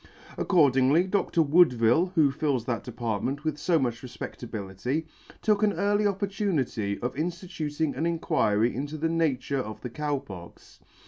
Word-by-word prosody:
Accordingly, 145 -2 +4
Dr. 185 -3 +1
Woodville, 155 0 +4
who 150 -4 +4
fills 135 -4 -1
that 120 -4 -2
department 120 +4 -3
with 155 -2 -2
fo 170 +2 +2
much 120 -5 -1
refpedlability, 120 - -5 0.4
took 210 -1 +2
an 210 -1 +3
early 205 +4 +2
opportunity 190 - -1
of 125 - -2
inftituting 160 -1 -3
an 165 - 0
Inquiry 115 -9 +1
into 145 +4 -4
the. 165 +2 0
nature 145 -4 0
of 110 -4 -5
the 125 - -6
Cow 145 +2 -1
Pox. 95 -11 -12
145 Hz, 140 wpm, -27 LUFS, 125-170 Hz, 0.4 s, Accordingly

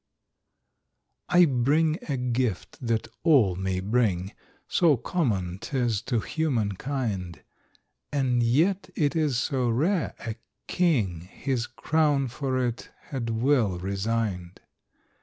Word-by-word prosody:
I 175 0 +6
bring 155 +4 +2
a 140 - 0
gift 125 -5 -2
that 115 -3 -1
all 135 - +5
may 95 0 -2
bring, 100 -3 0 0.3
So 160 -6 +4
common 100 - -1
'tis 120 -5 -1
to 120 -4 +1
human 125 -11 0
kind; 100 -6 -3 0.7
And 130 -4 +1
yet 160 +12 +2
it 145 0 +1
is 150 -6 +1
so 130 -2 0
rare, 160 - +1
a 115 -1 -4 0.3
king 115 - +1
His 130 -4 -2
crown 145 0 +1
for 130 0 -1
it 120 0 -4 0.2
had 125 -5 -3
well 115 -4 +2
resigned. 100 -1 -2
125 Hz, 115 wpm, -26 LUFS, 105-145 Hz, 0.7 s, I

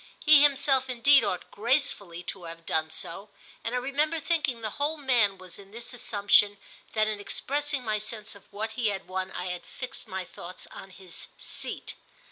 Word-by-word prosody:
He 305 -2 +8
himself 270 -2 +4
indeed 270 +2 +6
ought 190 -4 -3
gracefully 205 - +1
to 180 0 -5
have 165 0 -9
done 160 0 +1
so, 195 +5 -6 0.3
and 230 +2 -2
I - - +2
remember 295 +5 +1
thinking 295 -7 0
the 215 -1 -2
whole 305 +2 +2
man 240 -9 +3
was 185 0 -8
in 195 -1 -13
this 235 +4 -3
assumption 205 -3 +4 0.4
that 215 -1 +3
in 215 -1 -2
expressing 285 +5 -1
my 215 -2 0
sense 215 +1 -4
of 200 - -17
what 220 +2 -3
he 230 0 0
had 200 -2 -2
won 185 0 -3
I - - -4
had 180 - -6
fixed 255 - -7
my 190 -1 -4
thoughts 180 +1 -8
on 190 - -10
his 185 -2 -6
"seat." - - -3
215 Hz, 185 wpm, -28 LUFS, 195-265 Hz, 0.4 s, He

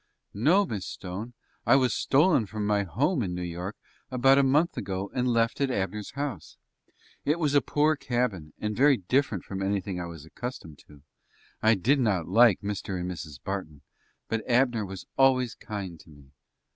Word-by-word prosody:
"No, 165 - +3
Miss 100 - -5
Stone; 100 +7 -7 0.3
I 120 - +5
was 130 -3 +3
stolen 145 - +3
from 105 +1 -4
my 105 0 +2
home 130 - 0
in 90 -5 -2
New 90 - -4
York 90 +3 -5 0.3
about 135 +2 +4
a - - +4
month 150 +6 +2
ago, 95 0 -4
and 125 0 0
left 115 +2 +1
at 140 - +2
Abner's 100 -2 -3
house. 140 - -5 0.7
It 150 +3 +1
was 150 -4 0
a 145 - +5
poor 150 +1 +2
cabin, 120 - -2
and 105 0 -3
very 140 +2 +5
different 115 +1 0
from 95 -1 -6
anything 95 -1 -1
I 85 - -4
was 80 -3 -10
accustomed 85 - -7
to. 70 -2 -17 0.6
I 110 +1 +5
did 130 +9 +2
not 100 -9 +1
like 115 +2 +5
Mr. 100 -2 -3
and 90 +1 -3
Mrs. 75 -6 -8
Barton; 95 -7 -5 0.5
but 115 -1 -2
Abner 120 -4 +2
was 95 -1 -8
always 130 -3 +4
kind 95 -6 -7
to - - -17
me." 70 -3 -17
105 Hz, 180 wpm, -27 LUFS, 95-130 Hz, 0.7 s, I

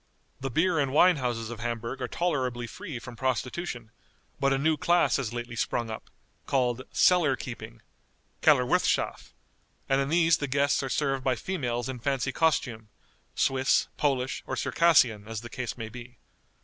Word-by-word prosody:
The 135 - -3
beer 165 +5 +2
and 140 -2 +1
wine 175 +4 +5
houses 120 -3 -2
of 120 - -7
Hamburg 115 +2 -4
are 125 - -1
tolerably 130 -9 -1
free 160 - -7
from 120 +1 -9
prostitution; 125 0 -3 0.5
but 135 -1 +2
a 135 - +2
new 155 +3 +2
class 175 +3 +3
has 130 -5 -3
lately 120 -1 -5
sprung 115 0 -1
up, 110 - -8 0.4
called 125 -2 +1
"cellar 170 -7 +4
keeping" - - -8 0.6
(kellerwirthschaff), - - +2 0.6
and 135 0 +2
in 135 - -2
these 165 0 +4
the 145 - -3
guests 140 +2 +2
are 135 - -3
served 135 -1 0
by 130 -2 +2
females 120 -7 -3
in 130 -2 -5
fancy 135 +1 -1
costume, 125 -8 0 0.5
Swiss, 135 0 +2
Polish, 135 -3 0
or - - -2
Circassian, 125 -11 +3
as 110 -1 -5
the 120 - -10
case 120 -3 -4
may 115 -2 -5
be. 125 +1 -11
130 Hz, 160 wpm, -28 LUFS, 120-145 Hz, 0.6 s, wine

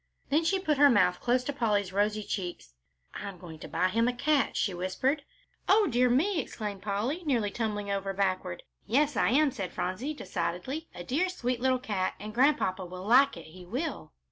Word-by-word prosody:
Then 300 +4 +3
she 385 +4 +2
put 310 -7 0
her 290 0 +8
mouth 185 -7 +3
close 250 +1 +1
to 285 - -3
Polly's 205 -7 0
rosy 210 +1 +1
cheek; 180 -3 -4 0.5
"I'm 200 -2 -6
going 165 -3 -10
to - - -8
buy 180 +3 +1
him 230 +4 +2
a 250 - +1
cat," 290 +3 +1
she 195 - 0
whispered. 190 - -1 0.5
"O 420 +1 +6
dear 250 -3 +3
me!" 325 +9 +2
exclaimed 210 -5 -6
Polly, 215 - -2
nearly 235 -9 0
tumbling 205 -2 -2
over 195 0 -1
backward. 185 -2 -1 0.2
"Yes, 285 +5 +2
I - - +3
am," 285 +3 +4
said 195 -6 -5
Phronsie, 230 +12 -3
decidedly, 185 - -4
"a 175 - -6
dear 310 - 0
sweet 250 -9 -2
little 260 0 +3
cat, 205 -7 -2
and 210 +2 -7
Grandpapa 245 -7 +2
will 185 +1 -8
like 265 +6 +5
it, - - -10
he 180 +3 -12
will." 245 - -4
225 Hz, 195 wpm, -29 LUFS, 190-275 Hz, 0.5 s, her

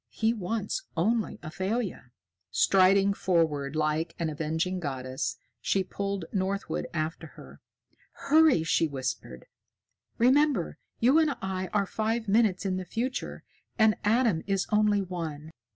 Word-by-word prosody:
He 225 +1 0
wants 215 - -3 0.2
only 220 +6 +1
Athalia." 190 - -3 0.4
Striding 195 - +4
forward 160 -7 0
like 155 +2 0
an 165 -2 -2
avenging 160 +4 -2
goddess, 130 -5 -3 0.2
she 195 - +1
pulled 195 -1 -4
Northwood 195 0 -2
after 160 0 -3
her. - - -13 0.5
"Hurry!" 300 - +4
she 165 0 +2
whispered. 130 - -5 0.7
"Remember, 260 - +2 0.2
you 260 +7 +5
and 305 -4 +2
I 190 -1 -3
are 205 -2 +1
five 220 +3 -2
minutes 205 -2 +2
in 185 -1 0
the 185 - -3
future, 245 +8 -4 0.3
and 220 -1 +5
Adam 220 -5 +2
is 195 -2 0
only 210 -1 +3
one. 160 -4 -6
190 Hz, 125 wpm, -28 LUFS, 160-220 Hz, 0.7 s, you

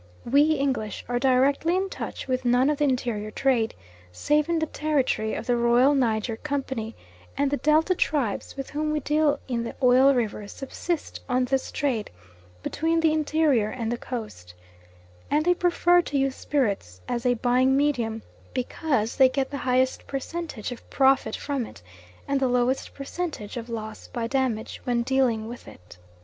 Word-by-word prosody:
We 290 +5 +4
English 265 -8 -2
are 245 +1 0
directly 270 +6 +3
in 380 +1 0
touch 380 - -6
with 255 0 -1
none 250 +3 +3
of 295 - -3
the 295 - +3
interior 240 -6 -1
trade 235 -1 +1 0.4
save 295 - +1
in 340 - +2
the 320 - +1
territory 285 -8 0
of - - -5
the 245 - +2
Royal 240 +4 +4
Niger 225 -4 0
Company, 265 -5 -3 0.4
and 280 -1 +1
the 285 - +1
Delta 310 +5 +3
tribes 280 - -1
with 270 - -5
whom 305 +1 -1
we 305 - 0
deal 295 0 +1
in 240 -3 -1
the 235 - -6
Oil 260 +2 +6
Rivers 210 -4 -2
subsist 315 +4 -4
on 250 0 +2
this 265 +1 -1
trade 255 -7 -1 0.5
between 325 +2 0
the 320 -1 +3
interior 300 -7 +2
and 230 -1 -3
the 240 - -1
Coast, 210 - -7 0.7
and 300 +2 +2
they 355 - +5
prefer 350 0 +3
to 290 -4 -3
use 270 -1 +1
spirits 200 - -1
as 240 -1 -2
a 245 -1 +3
buying 255 +3 +3
medium 235 -6 0 0.3
because 255 -3 -1
they 265 -1 +7
get 265 +1 -2
the 280 - -3
highest 255 +1 +1
percentage 275 -4 -5
of 245 - -10
profit 265 -5 +3
from 280 -3 -2
it, 85 - -14 0.4
and 275 0 +1
the 265 - +2
lowest 250 +1 0
percentage 280 - -5
of 240 -1 -6
loss 220 -2 -6
by 235 -3 -3
damage 245 -3 -1
when 240 -1 0
dealing 245 -4 +1
with 240 +1 -9
it. 90 0 -14
260 Hz, 170 wpm, -25 LUFS, 235-290 Hz, 0.7 s, they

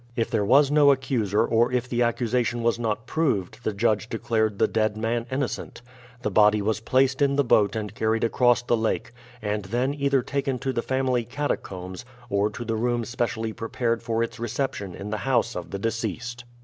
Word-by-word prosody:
If 115 - -1
there 110 -3 +1
was 135 +7 +5
no 145 -1 +6
accuser 120 -6 +2
or 120 +1 +2
if 125 0 0
the 120 -1 -1
accusation 120 0 0
was 115 0 +1
not 115 -1 -2
proved 130 - -1
the 110 - 0
judge 110 +1 0
declared 110 -2 0
the - - +3
dead 110 -1 0
man 115 +2 -1
innocent. 130 -2 -3 0.4
The 105 - -1
body 105 +1 +5
was 110 +2 0
placed 130 +4 +2
in 140 -1 +3
the 140 - +3
boat 110 -3 +3
and 105 -1 -4
carried 110 0 0
across 120 +1 +3
the 120 - +2
lake, 110 +1 -1 0.3
and 105 -1 -2
then 125 +7 0
either 140 -2 +1
taken 135 -1 -1
to 135 +1 -2
the 115 - 0
family 130 -1 0
catacombs 100 -8 -4 0.3
or 100 +1 +2
to 115 +3 -7
the 115 0 -1
room 120 +1 0
specially 115 -1 -2
prepared 115 +1 -2
for 115 -1 0
its 115 +1 -5
reception 115 -5 -3
in 105 +2 -7
the 110 - -1
house 120 -1 0
of 90 - -5
the 100 - -4
deceased. 115 +3 -3
115 Hz, 195 wpm, -25 LUFS, 110-125 Hz, 0.4 s, no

